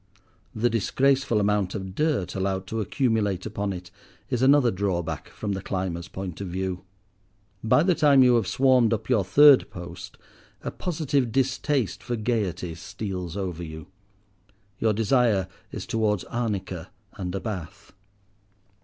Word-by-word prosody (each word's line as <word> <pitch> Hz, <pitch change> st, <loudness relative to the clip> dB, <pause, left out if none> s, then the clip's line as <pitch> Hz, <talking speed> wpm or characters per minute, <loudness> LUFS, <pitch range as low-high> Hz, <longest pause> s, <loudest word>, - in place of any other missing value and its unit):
The 115 Hz, +3 st, +2 dB
disgraceful 130 Hz, +2 st, +2 dB
amount 100 Hz, -2 st, +1 dB
of 95 Hz, -2 st, -5 dB
dirt 150 Hz, -, 0 dB
allowed 95 Hz, 0 st, -2 dB
to 110 Hz, +3 st, -3 dB
accumulate 105 Hz, -5 st, 0 dB
upon 100 Hz, -2 st, -3 dB
it 90 Hz, -1 st, -7 dB, 0.4 s
is 125 Hz, -, 0 dB
another 135 Hz, -2 st, +5 dB
drawback 95 Hz, -4 st, -2 dB
from 105 Hz, -, -5 dB
the 95 Hz, -1 st, -3 dB
climber's 90 Hz, -3 st, -3 dB
point 95 Hz, -2 st, -6 dB
of 100 Hz, -, -4 dB
view. 95 Hz, +1 st, -3 dB, 0.8 s
By 110 Hz, +7 st, +4 dB
the 180 Hz, +1 st, +3 dB
time 145 Hz, -4 st, +5 dB
you 125 Hz, -1 st, +5 dB
have 110 Hz, -5 st, 0 dB
swarmed 130 Hz, -2 st, +4 dB
up 110 Hz, +3 st, -6 dB
your 110 Hz, -6 st, +3 dB
third 140 Hz, +8 st, +6 dB
post 85 Hz, 0 st, -9 dB, 0.5 s
a -, -, -3 dB
positive 145 Hz, -8 st, -1 dB
distaste 135 Hz, -, 0 dB
for 120 Hz, -, -3 dB
"gaiety" 105 Hz, -7 st, -2 dB
steals 90 Hz, +1 st, -5 dB
over 90 Hz, -4 st, -3 dB
you. 80 Hz, +1 st, -9 dB, 0.9 s
Your 110 Hz, -1 st, +2 dB
desire 110 Hz, -3 st, +2 dB, 0.2 s
is -, -, -6 dB
towards 105 Hz, -4 st, 0 dB
arnica 100 Hz, -7 st, -3 dB, 0.2 s
and 90 Hz, -2 st, -5 dB
a -, -, -1 dB
bath. 95 Hz, -6 st, -7 dB
105 Hz, 145 wpm, -25 LUFS, 95-125 Hz, 0.9 s, third